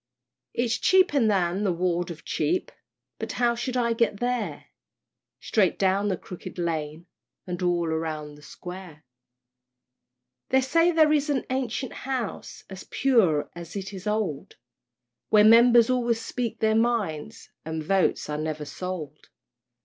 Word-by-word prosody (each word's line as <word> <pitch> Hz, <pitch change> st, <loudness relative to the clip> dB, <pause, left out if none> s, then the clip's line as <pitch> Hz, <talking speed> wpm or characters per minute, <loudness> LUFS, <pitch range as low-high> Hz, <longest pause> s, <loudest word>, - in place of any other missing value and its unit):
It's 240 Hz, +1 st, 0 dB
cheaper 370 Hz, -6 st, +4 dB
than 195 Hz, -2 st, +1 dB
the 195 Hz, -, +2 dB
Ward 175 Hz, 0 st, -1 dB
of 165 Hz, -2 st, -9 dB
Cheap, 360 Hz, +2 st, -1 dB, 0.5 s
But -, -, -4 dB
how 240 Hz, -1 st, +2 dB
shall 250 Hz, +2 st, -3 dB
I 235 Hz, -1 st, +2 dB
get 225 Hz, -3 st, 0 dB
there? 245 Hz, -1 st, -2 dB, 0.7 s
"Straight 205 Hz, -4 st, +1 dB
down 195 Hz, +1 st, +2 dB
the 190 Hz, -3 st, 0 dB
Crooked 180 Hz, +1 st, -10 dB
Lane, 160 Hz, -1 st, -3 dB, 0.4 s
And 180 Hz, -1 st, -5 dB
all 175 Hz, -1 st, +1 dB
round 155 Hz, -2 st, -3 dB
the 150 Hz, -, -16 dB
Square." 180 Hz, -1 st, -10 dB, 1.5 s
They 265 Hz, 0 st, +4 dB
say 330 Hz, +6 st, +3 dB
there 315 Hz, -2 st, +4 dB
is 295 Hz, 0 st, +1 dB
an 280 Hz, -3 st, 0 dB
ancient 260 Hz, -1 st, -2 dB
House, 255 Hz, -5 st, -5 dB
As 190 Hz, -1 st, -9 dB
pure 185 Hz, -, +2 dB
as 170 Hz, 0 st, -9 dB
it 195 Hz, 0 st, -5 dB
is 190 Hz, +1 st, -7 dB
old, 210 Hz, -9 st, -2 dB, 0.7 s
Where 210 Hz, -1 st, +6 dB
Members 235 Hz, +2 st, +7 dB
always 240 Hz, -2 st, +1 dB
speak 235 Hz, 0 st, -4 dB
their 220 Hz, 0 st, +3 dB
minds 220 Hz, -9 st, -1 dB
And 160 Hz, 0 st, -4 dB
votes 190 Hz, +3 st, +1 dB
are 150 Hz, 0 st, -3 dB
never 155 Hz, -1 st, -3 dB
sold. 160 Hz, -3 st, -7 dB
200 Hz, 140 wpm, -26 LUFS, 170-240 Hz, 1.5 s, Members